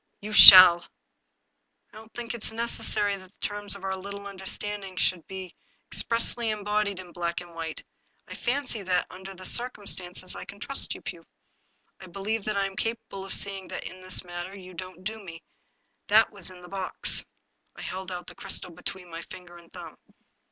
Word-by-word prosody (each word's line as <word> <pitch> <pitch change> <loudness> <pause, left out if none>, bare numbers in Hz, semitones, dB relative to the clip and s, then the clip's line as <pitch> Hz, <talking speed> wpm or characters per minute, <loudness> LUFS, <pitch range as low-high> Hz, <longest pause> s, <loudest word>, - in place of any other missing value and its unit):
"You 210 +1 -7
shall!" 185 -4 +12 0.6
" - - -47
I - - -16
don't 220 +1 -13
think 240 -1 -5
it 235 -2 -8
is - - +1
necessary 220 -3 +1
that 185 -1 -15
the - - -1
terms 205 -1 0
of 195 - -12
our 190 0 -2
little 200 +1 -8
understanding 195 0 -5
should 180 -3 0
be 190 -2 -8 0.3
expressly 230 0 +2
embodied 210 -2 -1
in 180 -2 -10
black 170 -1 -3
and 175 -1 -12
white. 165 -1 -6 0.4
I - - -8
fancy 250 -3 -2
that, 180 -2 0
under 190 +1 -10
the 185 0 -11
circumstance, 195 -7 -2
I - - -7
can 200 - -12
trust 275 +5 -1
you, - - -12
Pugh. - - -8 0.7
I 190 - -11
believe 200 +4 -3
that 215 -1 -2
I 200 - +1
am 195 0 -6
capable 225 -3 -4
of 195 - -8
seeing 195 -2 -4
that, - - -6
in 185 - -11
this 185 0 +1
matter, 175 +2 -7
you 185 -1 -12
don't 185 +1 -9
do 220 +1 -5
me. 165 -3 -10 0.6
That 220 +2 +5
was 195 -4 -4
in 180 -1 -14
the - - -11
box." 190 0 -3 0.5
I - - -10
held 190 0 -6
out 175 -1 -6
the - - -8
crystal - - -3
between 180 +2 -7
my 165 -1 -8
finger 180 -3 -12
and 170 -1 -20
thumb. - - -11
195 Hz, 195 wpm, -27 LUFS, 180-210 Hz, 0.7 s, shall